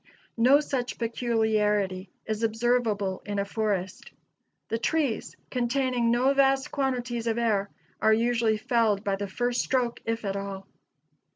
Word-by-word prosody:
No 260 +5 +6
such 255 -4 -3
peculiarity 215 -5 0 0.2
is 215 0 -3
observable 225 -4 0
in 205 -1 -4
a 200 - 0
forest. 200 -3 -2 0.6
The 225 - -1
trees, 285 -5 -1 0.2
containing 250 -1 +1
no 250 +4 +3
vast 270 +1 +2
quantities 245 -4 -2
of 225 0 0
air, 210 -4 +1 0.3
are 220 - +4
usually 230 -1 +2
felled 225 -4 +1
by 200 -2 0
the 200 +1 -4
first 245 +5 0
stroke, 245 -3 0
if 225 -1 -3
at 195 0 -2
all. 195 -1 -5
230 Hz, 135 wpm, -27 LUFS, 205-245 Hz, 0.6 s, No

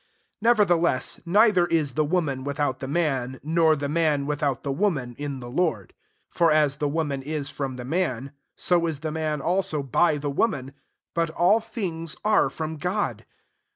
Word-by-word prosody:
11 225 -2 +5
Nevertheless, 170 -7 +1
neither 200 -1 +4
is 155 -5 +1
' - - -21
the 155 - +2
woman 145 -5 -1
"ffithout 140 -2 -1
the 135 - -5
man, 135 -5 -1
nor 160 +1 +3
the 145 -1 -3
man 150 -2 +1
without 145 -2 -1
the 140 - -2
woman, 135 -7 -1
in 140 -2 -4
the 120 - -7
Lord. 125 - -1 0.4
12 - - -21
For 170 -2 +5
as 150 -2 +3
the 150 - 0
wo 160 +3 0
man 140 -3 -3
ia 150 +2 -3
from 135 -2 -4
the 125 -1 -7
man, 140 -4 -1 0.2
so 170 -2 +2
ia 160 - -2
the 155 +2 -5
man 155 -2 -2
also 170 -3 0
by 150 +4 +2
the 145 0 -3
woman: 140 - -1 0.4
but 165 0 0
all 180 +7 +3
things 165 -8 -4
are 215 - +4
from 160 0 -5
God. 185 +6 -2
155 Hz, 190 wpm, -25 LUFS, 140-170 Hz, 0.4 s, 11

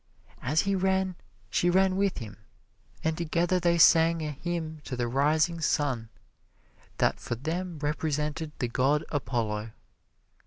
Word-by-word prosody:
As 150 +5 +2
he 200 0 0
ran, 190 0 +1 0.4
she 175 - +2
ran 190 +1 +3
with 195 0 +1
him, 110 -4 -7 0.7
and 160 0 +1
together 170 +2 +1
they 170 -1 +2
sang 165 0 +5
a 150 - -2
hymn 160 0 -4
to 130 - -4
the 120 -1 -1
rising 150 +6 +2
sun, 130 -8 0 0.9
that - - +1
for 120 - -4
them 165 +7 -4
represented 150 +1 -2
the 125 - -1
god 135 +6 +1
Apollo. 115 -6 -2
155 Hz, 140 wpm, -28 LUFS, 135-175 Hz, 0.9 s, sang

